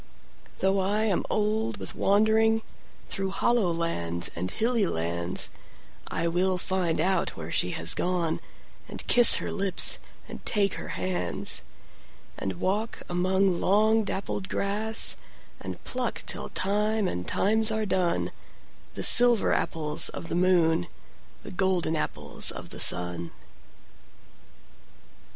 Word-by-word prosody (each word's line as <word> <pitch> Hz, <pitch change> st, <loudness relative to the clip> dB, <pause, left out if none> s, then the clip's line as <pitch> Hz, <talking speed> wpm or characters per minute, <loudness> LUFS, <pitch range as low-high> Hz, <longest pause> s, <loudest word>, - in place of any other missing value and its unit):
Though 195 Hz, +1 st, +1 dB
I 205 Hz, +3 st, 0 dB
am 205 Hz, -5 st, 0 dB
old 215 Hz, +1 st, -1 dB
with -, -, -6 dB
wanderingThrough 220 Hz, -2 st, -1 dB
hollow 230 Hz, -3 st, 0 dB
lands 85 Hz, -, -2 dB
and 90 Hz, +2 st, -3 dB
hilly 230 Hz, -, 0 dB
lands,I 85 Hz, -, -4 dB
will 180 Hz, +2 st, 0 dB
find 180 Hz, -3 st, -1 dB
out 185 Hz, +1 st, 0 dB
where 80 Hz, 0 st, -7 dB
she 90 Hz, -, 0 dB
has 80 Hz, +2 st, +4 dB
gone, 175 Hz, -3 st, -2 dB, 0.5 s
And -, -, -7 dB
kiss 240 Hz, -2 st, +9 dB
her -, -, -3 dB
lips 195 Hz, -2 st, 0 dB, 0.3 s
and -, -, -10 dB
take 200 Hz, -3 st, 0 dB
her -, -, -7 dB
hands; 185 Hz, -1 st, -1 dB, 0.7 s
And 95 Hz, -, -5 dB
walk 210 Hz, +4 st, -3 dB
among 185 Hz, +1 st, 0 dB
long 215 Hz, +3 st, +2 dB
dappled 190 Hz, -1 st, -4 dB
grass, 215 Hz, +3 st, +1 dB, 0.4 s
And -, -, -7 dB
pluck -, -, -3 dB
till -, -, -3 dB
time 210 Hz, +1 st, 0 dB
and 90 Hz, -, -5 dB
times 220 Hz, +2 st, +1 dB
are 220 Hz, 0 st, -2 dB
done, 180 Hz, -3 st, 0 dB, 0.6 s
The -, -, -4 dB
silver 240 Hz, -3 st, +7 dB
apples 150 Hz, -2 st, +2 dB
of 165 Hz, -, -7 dB
the -, -, -4 dB
moon, 175 Hz, -, +1 dB, 0.6 s
The -, -, -8 dB
golden 185 Hz, -3 st, -1 dB
apples 75 Hz, -, -1 dB
of -, -, -4 dB
the -, -, -7 dB
sun. 90 Hz, -1 st, +2 dB
190 Hz, 125 wpm, -26 LUFS, 165-215 Hz, 0.7 s, kiss